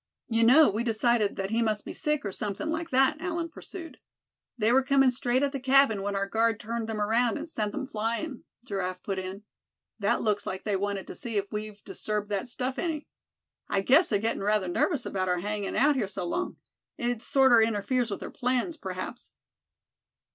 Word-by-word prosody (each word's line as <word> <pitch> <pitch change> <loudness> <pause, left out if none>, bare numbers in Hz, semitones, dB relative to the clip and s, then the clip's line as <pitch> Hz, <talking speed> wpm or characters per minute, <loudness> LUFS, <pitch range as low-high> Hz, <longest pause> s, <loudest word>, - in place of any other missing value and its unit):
"You 230 -1 +2
know 280 +7 +7
we 215 +4 0
decided 230 -2 +2
that 195 +1 -3
he 230 +1 +2
must 215 -2 0
be - - -6
sick 300 -5 -1
or 200 - -2
something 210 +11 -3
like 325 +1 -3
that," 270 +4 +3
Allan 340 -2 -2
pursued. 330 0 -9 0.6
"They 220 0 +2
were 265 +2 +5
coming 270 -1 +4
straight 250 +1 +1
at 280 - +1
the 275 - -3
cabin 265 -5 +4
when 200 0 -2
our 195 0 0
guard 225 +2 +1
turned 225 0 -4
them 220 -1 -3
around, 225 +3 +2
and 310 - -6
sent 215 -9 -3
'em 285 -2 -3
flyin'," 235 +4 -3 0.2
Giraffe 185 -5 -3
put 195 -2 -2
in. 190 +2 -6 0.6
"That - - +1
looks 210 -2 0
like 190 - -4
they 210 -2 0
wanted 200 0 -2
to - - -8
see 230 -3 -3
if 200 0 -2
we'd 210 -1 -6
disturbed 210 -1 -3
that 205 +4 -2
stuff 255 +2 -2
any. 320 -4 -2 0.6
I 195 - +1
guess 275 - +5
they're 210 - +2
gettin' 225 +3 -1
rather 205 -1 +1
nervous 260 - +1
about 185 -1 -1
our 180 - +2
hangin' 205 +2 -3
out 290 +2 +4
here 230 -7 0
so 185 -2 -3
long. 360 - -2 0.4
It 240 -2 -1
sorter 265 -4 +5
interferes 225 +3 +1
with 200 - -4
their - - -6
plans, 255 +6 -1
p'raps." - - -6
225 Hz, 200 wpm, -28 LUFS, 205-265 Hz, 0.6 s, know